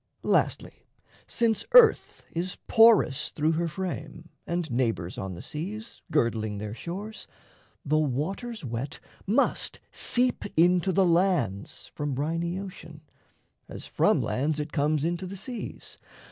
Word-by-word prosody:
Lastly, - - 0 0.4
since 230 -2 +1
earth 475 -3 +6
is 175 +2 -3
porous 225 - +5
through 155 +1 0
her 170 +1 0
frame, 170 -1 -5 0.2
And 170 -2 -2
neighbours 115 -8 -1
on 95 -2 -4
the 85 - -9
seas, 210 +9 -6
girdling 110 -7 0
their 105 +1 -5
shores, 195 - -7 0.6
The 155 +2 +2
water's 160 - -2
wet 120 +3 -4 0.3
must 210 - +1
seep 250 0 +1
into 180 +2 +4
the 190 +1 +3
lands 170 - 0
From 145 -3 -3
briny 165 +5 -1
ocean, 180 -5 -9 0.7
as - - -7
from - - +2
lands 150 +4 -1
it 150 0 -4
comes 150 -1 +1
Into 175 +2 -2
the 195 +2 -7
seas. 235 +4 -7
165 Hz, 130 wpm, -27 LUFS, 140-190 Hz, 0.7 s, earth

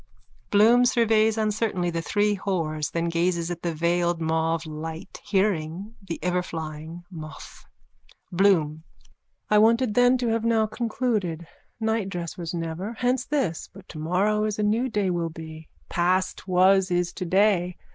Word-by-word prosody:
_ - - -29
Keekeereekee! 115 +1 -35
(Bloom 230 +4 +5
surveys 225 -2 +3
uncertainly 210 -5 0
the 165 0 -2
three 205 +4 +1
whores 165 -6 -2
then 165 0 -1
gazes 170 0 0
at 170 -1 -5
the 170 - -1
veiled 170 +1 0
mauve 160 0 0
light, 160 +3 -7
hearing 195 -1 -1
the 180 -4 -5
everflying 165 -2 -4
moth.) 155 -3 -10 0.7
BLOOM: 170 -5 +2 0.7
I 210 - +6
wanted 230 +1 +3
then 245 +2 +4
to 245 -2 -1
have 225 0 0
now 225 -1 +3
concluded. 215 -7 -2 0.3
Nightdress 195 -7 -2
was 170 -2 -5
never. 170 +5 -4
Hence 250 +2 0
this. 265 - -2
But 195 0 -15
tomorrow 185 +7 0
is 215 -1 -2
a 210 - 0
new 225 +5 +1
day 205 -4 0
will 170 -1 -1
be. 160 -1 -10 0.2
Past 185 +2 0
was 185 +1 +4
is 175 0 0
today. 180 -1 +1
180 Hz, 145 wpm, -25 LUFS, 165-215 Hz, 0.7 s, I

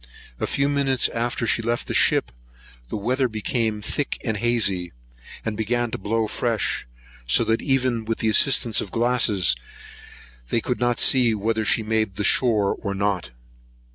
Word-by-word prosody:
A - - -1
few 140 0 0
minutes 140 -3 +1
after 120 0 -2
she 115 - +1
left 120 +1 -2
the - - -4
ship, - - +3 0.6
the - - -3
weather 125 +5 0
became 110 -1 -2
thick 145 - -2
and 110 -3 -1
hazy, 100 -6 0 0.5
and 110 - -2
began 120 +2 -1
to - - -4
blow 110 +3 -1
fresh; 115 - -1 0.4
so - - +4
that, 115 0 0
even 130 -4 0
with 115 0 -2
the 110 - -1
assistance 115 0 +3
of - - -6
glasses, 115 -5 +2 0.9
they - - +1
could 125 +2 -3
not 120 -1 0
see 120 -4 +3
whether 110 +2 -1
she 110 +1 +2
made 110 -3 -1
the 105 - -3
shore 105 -4 +3
or 100 -2 -3
not. 100 -5 -1
115 Hz, 165 wpm, -23 LUFS, 105-120 Hz, 0.9 s, so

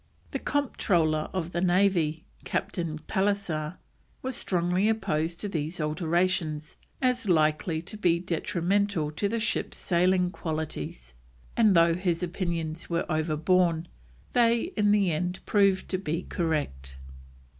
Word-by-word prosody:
The - - -2
Comptroller 170 - +1
of 175 -3 -3
the 175 - -1
Navy, 175 -4 +2 0.2
Captain 170 -5 -2
Pallisser, 185 -3 -1 0.5
was 260 -1 -2
strongly 180 +3 +1
opposed 165 -6 -1
to 210 - -2
these 165 -2 -3
alterations 160 0 0 0.3
as 250 -4 +1
likely 160 0 +2
to 215 - -6
be 175 -4 +3
detrimental 180 -1 0
to 200 +6 -1
the 230 +2 -1
ship's 215 - -1
sailing 180 0 +2
qualities, 155 - -5 0.4
and 215 -5 +5
though 165 0 +5
his 175 -1 -1
opinions 170 -2 -3
were 170 0 0
overborne, 160 +2 +2 0.5
they 235 +6 +3
in 210 -1 +3
the 200 -4 +3
end 180 +3 -1
proved 195 -2 +3
to 185 - -1
be 170 -1 -2
correct. 70 - -2
175 Hz, 125 wpm, -28 LUFS, 160-195 Hz, 0.5 s, and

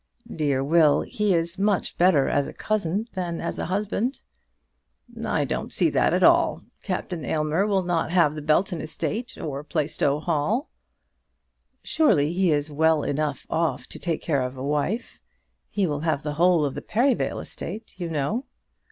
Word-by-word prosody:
"Dear 140 -4 +1
Will. 155 0 +4
He 210 -3 0
is 170 +2 -1
much 200 -1 +1
better 170 -6 +4
as 145 - +1
a - - -8
cousin 210 0 -1
than 175 -3 -3
as - - -3
a - - -2
husband." 210 +7 -2 1.0
"I - - +1
don't - - -3
see - - +2
that - - +3
at - - +2
all. - - +4 0.2
Captain 175 -7 -4
Aylmer 155 +8 0
will 195 -3 +1
not 175 -2 0
have 170 -4 +3
the 155 - -6
Belton 160 +3 +1
estate 225 +9 -4
or 145 -2 -5
Plaistow 150 -2 0
Hall." 170 - -1 1.1
"Surely 160 - +2
he 185 0 +2
is 145 0 0
well 160 0 +3
enough 145 -1 -2
off 165 0 -1
to - - -9
take 165 -3 -2
care 145 -5 +1
of 125 +1 -4
a 130 - -5
wife. 150 - -2 0.5
He 200 -2 0
will 145 -4 -1
have 155 -2 -1
the 150 -1 -2
whole 170 0 +4
of 140 - -2
the - - -5
Perivale 250 +4 +1
estate, 215 -3 -8
you 175 -2 -3
know." 165 - -1
165 Hz, 170 wpm, -25 LUFS, 150-195 Hz, 1.1 s, Will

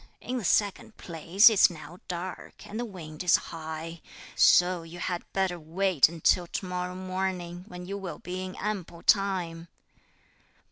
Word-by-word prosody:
In 255 - -4
the - - -6
second 205 +2 +1
place 170 +4 +4
it's 215 -4 +7
now 165 +1 -11
dark, 180 +1 -6
and 215 +2 -6
the 240 - -2
wind 165 -7 -8
is 180 - +6
high; 160 +1 -5 0.3
so 180 -1 +5
you 165 +1 -10
had 175 0 -4
better 190 -2 0
wait 170 -1 +3
until 170 +1 +2
to 190 - -4
morrow 180 0 -3
morning, 185 -1 -3
when 180 -3 -8
you 200 +2 -5
will 190 -3 -6
be 185 +1 -5
in 185 0 -6
ample 190 -5 -4
time." 180 -4 +1
180 Hz, 155 wpm, -28 LUFS, 170-190 Hz, 0.3 s, it's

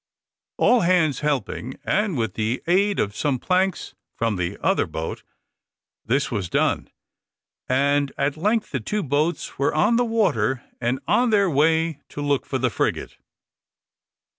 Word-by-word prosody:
All 245 - +4
hands 170 -5 +2
helping, 130 -3 -2
and 195 0 0
with 110 -5 -1
the 110 +4 -2
aid 195 +4 +2
of 100 +1 -1
some 140 +2 0
planks 185 +6 0 0.2
from 115 -2 0
the 90 -2 -3
other - - +1
boat, 80 0 -5 0.8
this 135 +5 0
was 100 -7 -2
done, - - 0 0.8
and 140 +2 +2
at 140 +1 0
length 210 +7 0
the 130 - -1
two 210 - -2
boats 150 +4 -1
were 140 +2 +1
on 210 +9 +3
the 245 - +3
water, 145 - +1 0.4
on 245 +8 +3
their 200 -4 +3
way 160 +1 +2
to - - -8
look 145 -2 0
for 135 - -1
the 130 -2 0
frigate. - - -2
145 Hz, 145 wpm, -23 LUFS, 130-185 Hz, 0.8 s, All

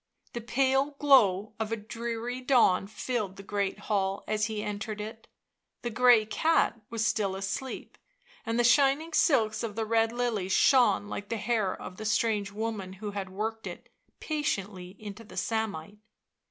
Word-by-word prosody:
The 235 - -4
pale 270 +4 +1
glow 220 -9 +4
of 220 0 -2
a 225 - 0
dreary 235 +3 -5
dawn 240 -8 +3
filled 215 -2 -3
the 195 - -10
great 200 0 -2
hall 195 -2 -1
as 215 0 +1
he 215 -2 -4
entered 210 +1 -4
it; 220 +2 -7 0.6
the 240 - -2
grey 240 -1 +5
cat 315 +1 +1
was 225 -1 -1
still 205 -4 0
asleep, 195 +7 -5 0.4
and 230 +1 -2
the - - +4
shining 280 +6 +3
silks 220 -10 +3
of 220 -3 -4
the 225 0 -1
red 225 0 +2
lily 235 -6 -1
shone 245 0 +4
like 205 0 -6
the 230 - -1
hair 215 -3 -1
of 185 - -9
the 215 - -6
strange 215 -2 +1
woman 210 -3 -4
who 205 +2 -6
had 200 -2 -5
worked 220 +3 -4
it - - -9 0.3
patiently 195 - -3
into 210 +1 -9
the 215 - -13
samite. 210 -4 -3
220 Hz, 165 wpm, -29 LUFS, 205-240 Hz, 0.6 s, grey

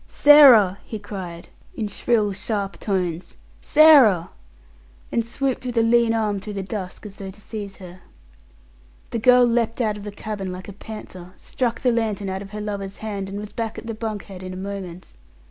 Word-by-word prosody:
"Sarah!" 255 -10 +7
he 220 - -6
cried, 190 -5 -8 0.3
in 220 - -2
shrill 210 0 0
sharp 200 0 -3
tones. 180 -4 -3 0.3
"Sarah!" 275 - +6 0.8
and 230 - +1
swooped 260 +3 -2
with 245 -1 -4
a 230 - +4
lean 230 0 +3
arm 215 -3 0
through 210 +2 -7
the 195 - -3
dusk, 190 0 -6
as 205 -1 -10
though 195 -1 -7
to 190 - -12
seize 205 -2 -7
her. 185 -1 -12 1.1
The 230 - -2
girl 250 +2 +6
leapt 230 -1 0
out 215 -3 0
of - - -10
the 205 - -5
cabin 205 -2 -5
like 185 +1 -8
a 200 - -8
panther, 185 -4 -10
struck 240 -2 -3
the 250 - +3
lantern 215 -4 -1
out 190 0 -4
of 200 - -9
her 210 +1 -6
lover's 200 -2 -5
hand, 200 -3 -5
and 200 - -6
was 210 0 -7
back 225 -1 -4
at - - -8
the 225 - -4
bunk 215 -2 -5
head 190 -2 -11
in 185 0 -7
a - - -7
moment. 190 -2 -7
210 Hz, 195 wpm, -22 LUFS, 195-230 Hz, 1.1 s, Sarah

